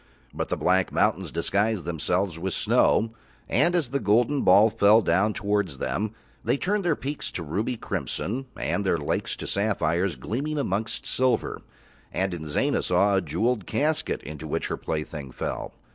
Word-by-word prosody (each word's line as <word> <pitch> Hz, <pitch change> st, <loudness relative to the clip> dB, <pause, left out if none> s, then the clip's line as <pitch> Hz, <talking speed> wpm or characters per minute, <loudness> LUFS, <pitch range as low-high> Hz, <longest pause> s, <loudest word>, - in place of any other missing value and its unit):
But -, -, -3 dB
the -, -, -1 dB
black 95 Hz, +1 st, +2 dB
mountains -, -, +1 dB
disguised 100 Hz, +2 st, 0 dB
themselves 85 Hz, +1 st, -1 dB
with 95 Hz, +2 st, -2 dB
snow, 115 Hz, +1 st, +3 dB, 0.4 s
and 175 Hz, +1 st, +3 dB
as 160 Hz, -8 st, +1 dB
the 140 Hz, +2 st, 0 dB
golden 120 Hz, +6 st, +2 dB
ball 105 Hz, +4 st, +6 dB
fell 110 Hz, 0 st, +5 dB
down 95 Hz, +6 st, +3 dB
towards 100 Hz, -8 st, -1 dB
them 105 Hz, +10 st, -2 dB, 0.3 s
they -, -, +1 dB
turned 200 Hz, +6 st, 0 dB
their 170 Hz, -4 st, +2 dB
peaks 140 Hz, +2 st, -4 dB
to 85 Hz, -, -4 dB
ruby 105 Hz, +10 st, -2 dB
crimson 105 Hz, -, -3 dB
and 100 Hz, -, -1 dB
their 95 Hz, -3 st, +2 dB
lakes 75 Hz, -, -2 dB
to -, -, -7 dB
sapphires 95 Hz, -4 st, 0 dB
gleaming 125 Hz, -, -3 dB
amongst 110 Hz, -5 st, -2 dB
silver, 130 Hz, -1 st, 0 dB, 0.5 s
and 95 Hz, 0 st, -1 dB
Inzana 80 Hz, -3 st, 0 dB
saw 100 Hz, 0 st, +3 dB
a 95 Hz, -, +3 dB
jewelled 115 Hz, -2 st, -1 dB
casket 150 Hz, +2 st, 0 dB
into 75 Hz, +1 st, -7 dB
which -, -, -2 dB
her -, -, -1 dB
plaything 75 Hz, -3 st, -4 dB
fell. -, -, -4 dB
100 Hz, 160 wpm, -26 LUFS, 85-120 Hz, 0.5 s, ball